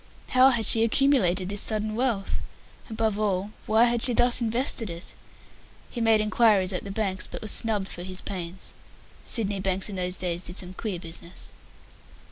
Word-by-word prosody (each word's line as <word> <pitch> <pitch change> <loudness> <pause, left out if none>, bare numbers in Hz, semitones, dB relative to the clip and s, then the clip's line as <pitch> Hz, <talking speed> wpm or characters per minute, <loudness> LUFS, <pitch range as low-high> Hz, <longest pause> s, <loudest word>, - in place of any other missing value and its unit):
How 255 +1 +6
had 235 -4 0
she 225 +2 +4
accumulated 230 -8 +2
this 205 +1 +2
sudden 215 -1 0
wealth? 230 -4 -1 0.5
Above 220 -2 -1
all, 200 -1 -1 0.2
why 220 +2 +4
had 240 -1 +2
she 245 -1 +4
thus 245 +1 +3
invested 230 -1 0
it? 170 +1 -8 0.8
He 240 - -5
made 225 -1 +4
inquiries 210 -3 +3
at 180 - -2
the 200 - -7
banks, 195 -2 -2
but - - -8
was 215 - +1
snubbed 215 -4 +1
for 175 - -7
his 185 +1 -4
pains. 180 -1 -5 0.5
Sydney 205 -4 0
banks 190 +1 0
in 195 - -6
those 180 0 -2
days 175 -1 -3
did 180 +1 -8
some 180 -1 -2
queer 200 -1 -4
business. 170 +1 -9
205 Hz, 175 wpm, -26 LUFS, 185-225 Hz, 0.8 s, How